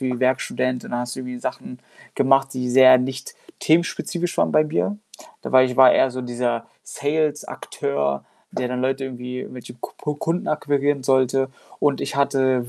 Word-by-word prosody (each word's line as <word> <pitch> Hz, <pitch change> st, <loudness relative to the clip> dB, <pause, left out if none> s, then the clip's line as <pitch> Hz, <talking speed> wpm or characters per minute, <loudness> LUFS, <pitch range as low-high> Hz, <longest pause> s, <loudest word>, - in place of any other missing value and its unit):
wie 130 Hz, -2 st, -2 dB
Werkstudent 130 Hz, 0 st, 0 dB
und -, -, -9 dB
dann 120 Hz, -, -1 dB
hast 125 Hz, +1 st, -5 dB
du -, -, -5 dB
irgendwie 125 Hz, -1 st, -6 dB
Sachen 125 Hz, +1 st, -6 dB, 0.4 s
gemacht, 135 Hz, 0 st, +3 dB
die 125 Hz, -1 st, -2 dB
sehr 130 Hz, 0 st, +8 dB
nicht-themenspezifisch 160 Hz, +6 st, -2 dB
waren -, -, +2 dB
bei 155 Hz, -, +4 dB
mir. 165 Hz, +6 st, -1 dB, 0.5 s
Dabei 130 Hz, 0 st, +4 dB
ich 125 Hz, -1 st, -3 dB
war 130 Hz, -1 st, +8 dB
eher 135 Hz, -, +3 dB
so 130 Hz, +1 st, -5 dB
dieser 120 Hz, -1 st, -2 dB, 0.2 s
Sales-Akteur, 145 Hz, -, -2 dB, 0.3 s
der 125 Hz, -, -2 dB
dann 125 Hz, 0 st, -3 dB
Leute 135 Hz, +1 st, -1 dB
irgendwie 125 Hz, -1 st, -6 dB
irgendwelche 125 Hz, -1 st, -9 dB
Ku 120 Hz, -, -9 dB
Pu 150 Hz, -, -3 dB
Kunden 165 Hz, +4 st, -2 dB
akquirieren 145 Hz, -2 st, 0 dB
sollte. 130 Hz, 0 st, +2 dB, 0.3 s
Und 145 Hz, -2 st, +1 dB
ich -, -, -4 dB
hatte 130 Hz, -3 st, +1 dB
130 Hz, 165 wpm, -22 LUFS, 125-140 Hz, 0.5 s, sehr